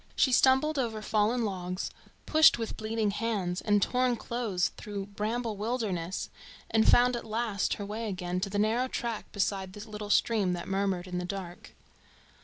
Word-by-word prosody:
She 260 Hz, -, +3 dB
stumbled 265 Hz, +4 st, +4 dB
over 225 Hz, -4 st, -1 dB
fallen 220 Hz, +3 st, +1 dB
logs, 185 Hz, -2 st, -3 dB, 0.3 s
pushed 315 Hz, -3 st, +6 dB
with 225 Hz, -1 st, -4 dB
bleeding 220 Hz, -1 st, -1 dB
hands 200 Hz, -4 st, -2 dB
and 205 Hz, -2 st, +3 dB
torn 250 Hz, -1 st, +2 dB
clothes 225 Hz, -7 st, -1 dB
through 200 Hz, -2 st, -5 dB
bramble 215 Hz, +2 st, -3 dB
wildernesses, 205 Hz, -6 st, -2 dB, 0.4 s
and 220 Hz, -1 st, +4 dB
found 245 Hz, 0 st, +5 dB
at 240 Hz, -, -4 dB
last 220 Hz, -2 st, -1 dB
her 205 Hz, -, -5 dB
way 215 Hz, +2 st, -4 dB
again 180 Hz, -1 st, -3 dB
to 195 Hz, +2 st, -2 dB
the 205 Hz, -, -3 dB
narrow 225 Hz, +5 st, +2 dB
track 235 Hz, -3 st, -4 dB
beside 195 Hz, -2 st, -1 dB
the 210 Hz, +2 st, -9 dB
little 210 Hz, -1 st, -6 dB
stream 210 Hz, -4 st, +2 dB
that 175 Hz, -, -5 dB
murmured 195 Hz, -2 st, 0 dB
in 180 Hz, -1 st, -3 dB
the -, -, -3 dB
dark. 180 Hz, -2 st, -7 dB
210 Hz, 170 wpm, -29 LUFS, 195-230 Hz, 0.4 s, pushed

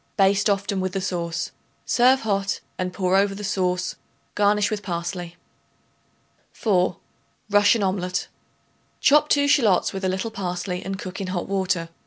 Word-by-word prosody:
Baste 195 Hz, +1 st, +3 dB
often 200 Hz, -1 st, 0 dB
with 185 Hz, -1 st, -2 dB
the 195 Hz, -, -1 dB
sauce. 175 Hz, -3 st, -3 dB, 0.3 s
Serve 255 Hz, +2 st, +4 dB
hot, 200 Hz, -2 st, -1 dB, 0.2 s
and 185 Hz, 0 st, -1 dB
pour 185 Hz, 0 st, 0 dB
over 195 Hz, 0 st, +3 dB
the 210 Hz, -, -7 dB
sauce; 185 Hz, -2 st, -1 dB, 0.4 s
garnish 205 Hz, 0 st, +2 dB
with 210 Hz, -1 st, -2 dB
parsley. 175 Hz, -1 st, -4 dB, 1.2 s
4. 185 Hz, -4 st, +1 dB, 0.5 s
Russian 205 Hz, +1 st, +4 dB
Omelet. 185 Hz, -1 st, -1 dB, 0.7 s
Chop 300 Hz, +1 st, +4 dB
2 285 Hz, -1 st, +3 dB
shallots 225 Hz, -, +3 dB
with 195 Hz, 0 st, -5 dB
a 185 Hz, -, +1 dB
little 190 Hz, +4 st, -2 dB
parsley 180 Hz, -2 st, -3 dB
and 195 Hz, 0 st, -4 dB
cook 185 Hz, +1 st, -6 dB
in 190 Hz, -, -3 dB
hot 185 Hz, -1 st, -3 dB
water. 185 Hz, -4 st, -1 dB
195 Hz, 150 wpm, -23 LUFS, 180-205 Hz, 1.2 s, Serve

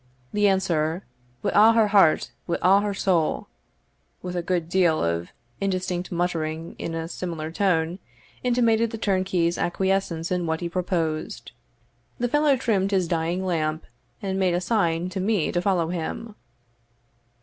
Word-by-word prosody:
The 210 Hz, 0 st, +3 dB
answer, 175 Hz, -3 st, +1 dB, 0.4 s
"Wi' -, -, +1 dB
a' 220 Hz, +2 st, +7 dB
her 225 Hz, -2 st, +4 dB
heart 195 Hz, -6 st, +4 dB, 0.2 s
wi' 170 Hz, -, 0 dB
a' 195 Hz, +2 st, +6 dB
her 205 Hz, 0 st, -1 dB
soul," 175 Hz, -5 st, +1 dB, 0.8 s
with 180 Hz, 0 st, -4 dB
a 175 Hz, -, 0 dB
good 170 Hz, -1 st, -1 dB
deal 175 Hz, -3 st, +2 dB
of 85 Hz, +1 st, -1 dB, 0.3 s
indistinct 185 Hz, -2 st, -2 dB
muttering 165 Hz, -2 st, -2 dB
in 165 Hz, -, -4 dB
a 165 Hz, 0 st, -3 dB
similar 165 Hz, -3 st, -5 dB
tone, 175 Hz, -2 st, +1 dB, 0.4 s
intimated 230 Hz, -2 st, +2 dB
the 225 Hz, -, -6 dB
turnkey's 185 Hz, -5 st, 0 dB
acquiescence 185 Hz, -2 st, -1 dB
in 180 Hz, -2 st, 0 dB
what 160 Hz, +1 st, -1 dB
he 170 Hz, -, -2 dB
proposed. 170 Hz, -3 st, -2 dB, 0.7 s
The 245 Hz, -, 0 dB
fellow 295 Hz, +1 st, +3 dB
trimmed 205 Hz, -6 st, +1 dB
his 190 Hz, -3 st, +1 dB
dying 170 Hz, +2 st, -1 dB
lamp, 160 Hz, -3 st, -1 dB, 0.4 s
and 190 Hz, -1 st, -1 dB
made 185 Hz, -2 st, +2 dB
a -, -, +1 dB
sign 180 Hz, -4 st, 0 dB
to 190 Hz, +1 st, -4 dB
me 195 Hz, -3 st, +1 dB
to 175 Hz, -, 0 dB
follow 180 Hz, -4 st, +1 dB
him. 180 Hz, +6 st, -4 dB
180 Hz, 150 wpm, -25 LUFS, 165-195 Hz, 0.8 s, a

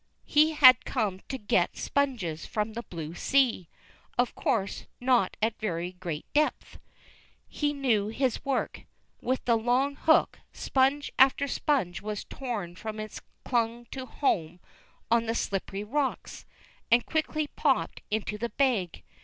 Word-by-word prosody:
He 310 Hz, +2 st, +4 dB
had 255 Hz, -4 st, +8 dB
come 210 Hz, -7 st, -1 dB
to 265 Hz, -, -3 dB
get 205 Hz, -6 st, +1 dB
sponges 230 Hz, -, -1 dB
from 215 Hz, -2 st, -2 dB
the 235 Hz, -, -4 dB
blue 165 Hz, -7 st, -7 dB
sea. 240 Hz, -4 st, +1 dB, 0.5 s
Of 245 Hz, 0 st, +1 dB
course 200 Hz, -3 st, -1 dB
not 245 Hz, -6 st, +2 dB
at 225 Hz, 0 st, 0 dB
very 175 Hz, -4 st, -2 dB
great 175 Hz, -4 st, -6 dB
depth. 305 Hz, +1 st, 0 dB, 0.7 s
He 295 Hz, -1 st, -1 dB
knew 245 Hz, -8 st, +1 dB
his 250 Hz, +3 st, -1 dB
work. 275 Hz, -1 st, -2 dB, 0.4 s
With 255 Hz, +2 st, -1 dB
the 235 Hz, -, +4 dB
long 250 Hz, +5 st, +1 dB
hook, 315 Hz, +3 st, +3 dB
sponge 270 Hz, +2 st, +1 dB
after 270 Hz, +2 st, +5 dB
sponge 260 Hz, -, 0 dB
was 210 Hz, 0 st, -4 dB
torn 215 Hz, -10 st, -5 dB
from 215 Hz, +3 st, -6 dB
its 215 Hz, 0 st, -7 dB, 0.2 s
clung 235 Hz, -1 st, 0 dB
to 260 Hz, -1 st, -6 dB
home 175 Hz, -, -1 dB, 0.5 s
on 230 Hz, -1 st, +3 dB
the 225 Hz, -, 0 dB
slippery 195 Hz, -1 st, -2 dB
rocks, 270 Hz, +5 st, -3 dB, 0.4 s
and 235 Hz, +1 st, +4 dB
quickly 310 Hz, -1 st, -1 dB
popped 290 Hz, -, 0 dB
into 210 Hz, 0 st, -2 dB
the 235 Hz, +1 st, -2 dB
bag. 210 Hz, -, 0 dB
235 Hz, 140 wpm, -28 LUFS, 200-270 Hz, 0.7 s, had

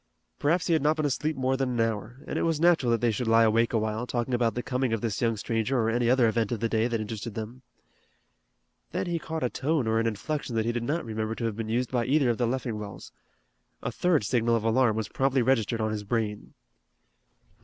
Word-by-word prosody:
Perhaps 165 Hz, +5 st, +2 dB
he 170 Hz, -, +2 dB
had 160 Hz, -, +3 dB
not 150 Hz, +2 st, +3 dB
been 155 Hz, -, 0 dB
asleep 150 Hz, +2 st, -1 dB
more 130 Hz, 0 st, 0 dB
than 135 Hz, -1 st, -1 dB
an 120 Hz, -2 st, -2 dB
hour, 115 Hz, +4 st, -2 dB
and -, -, -3 dB
it -, -, -1 dB
was 165 Hz, -2 st, +1 dB
natural 165 Hz, -7 st, +4 dB
that 115 Hz, -2 st, +1 dB
they 120 Hz, -, +3 dB
should 115 Hz, +3 st, -3 dB
lie 115 Hz, 0 st, +5 dB
awake 115 Hz, +1 st, +3 dB
a 115 Hz, -, +1 dB
while, 110 Hz, +2 st, -2 dB
talking 120 Hz, +1 st, -2 dB
about 120 Hz, -2 st, +1 dB
the 125 Hz, -, -2 dB
coming 130 Hz, -2 st, -1 dB
of 115 Hz, -, -1 dB
this 110 Hz, -4 st, -2 dB
young 115 Hz, -2 st, +1 dB
stranger 115 Hz, +5 st, -1 dB
or 115 Hz, 0 st, +1 dB
any 120 Hz, 0 st, +1 dB
other 125 Hz, -2 st, +4 dB
event 110 Hz, -1 st, 0 dB
of 120 Hz, -, -1 dB
the 115 Hz, -, 0 dB
day 110 Hz, 0 st, +1 dB
that 115 Hz, -2 st, -1 dB
interested 110 Hz, +1 st, -5 dB
them. 115 Hz, +3 st, -6 dB, 1.3 s
Then -, -, -1 dB
he 170 Hz, -1 st, -1 dB
caught 160 Hz, -1 st, -4 dB
a 125 Hz, -, +1 dB
tone 145 Hz, -1 st, 0 dB
or 110 Hz, 0 st, +1 dB
an 115 Hz, -, +1 dB
inflection 120 Hz, +4 st, -3 dB
that 110 Hz, -1 st, +1 dB
he 120 Hz, -, +1 dB
did 120 Hz, 0 st, -2 dB
not 150 Hz, +7 st, -2 dB
remember 110 Hz, 0 st, -3 dB
to 115 Hz, -, -3 dB
have 110 Hz, -2 st, -1 dB
been 110 Hz, 0 st, -4 dB
used 120 Hz, +2 st, 0 dB
by 120 Hz, -2 st, 0 dB
either 135 Hz, -2 st, +3 dB
of 115 Hz, -, -4 dB
the 120 Hz, -, +2 dB
Leffingwells. 105 Hz, -7 st, -4 dB, 0.7 s
A 115 Hz, -, -2 dB
third 165 Hz, 0 st, +2 dB
signal 115 Hz, +1 st, +2 dB
of 115 Hz, -, -1 dB
alarm 115 Hz, 0 st, +3 dB
was 110 Hz, -1 st, -2 dB
promptly 135 Hz, -1 st, +1 dB
registered 115 Hz, -3 st, +1 dB
on 110 Hz, 0 st, 0 dB
his 105 Hz, -1 st, -3 dB
brain. 105 Hz, -1 st, -3 dB
120 Hz, 245 wpm, -27 LUFS, 110-130 Hz, 1.3 s, lie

